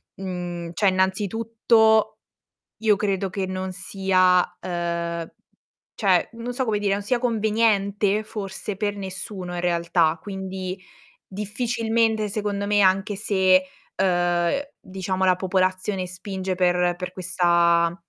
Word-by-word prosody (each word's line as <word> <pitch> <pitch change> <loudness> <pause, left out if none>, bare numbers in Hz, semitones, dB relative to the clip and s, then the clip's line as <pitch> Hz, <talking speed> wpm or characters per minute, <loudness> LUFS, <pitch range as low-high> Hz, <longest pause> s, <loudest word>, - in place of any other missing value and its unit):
mhmm, 175 -2 -5
cioè, 200 +2 +3
innanzitutto 220 +3 +2 0.6
io 215 -2 +4
credo 195 -1 -1
che 190 -1 -2
non 185 0 -4
sia, 185 -1 +2
ehm, 170 -1 -3 0.7
cioè, 190 -5 +2
non 235 +2 -5
so 260 +1 -1
come 215 -2 0
dire, 200 -1 +1
non 200 - -1
sia 245 +4 +1
conveniente 215 -3 +1
forse 210 -1 -5
per 205 0 -1
nessuno 190 -1 -5
in 175 - -3
realtà, 170 -1 +1
quindi 190 -1 -5 0.5
difficilmente 220 +1 0
secondo 200 -1 -2
me, 205 0 +3
anche 195 +2 +2
se, 190 -3 +3 0.4
uhm, 175 +5 +1 0.2
diciamo 190 0 -3
la 185 -1 +4
popolazione 185 +1 0
spinge 185 +1 -4
per 180 -1 +2
per 180 0 -5
questa 170 -2 +2
190 Hz, 120 wpm, -24 LUFS, 180-210 Hz, 0.7 s, io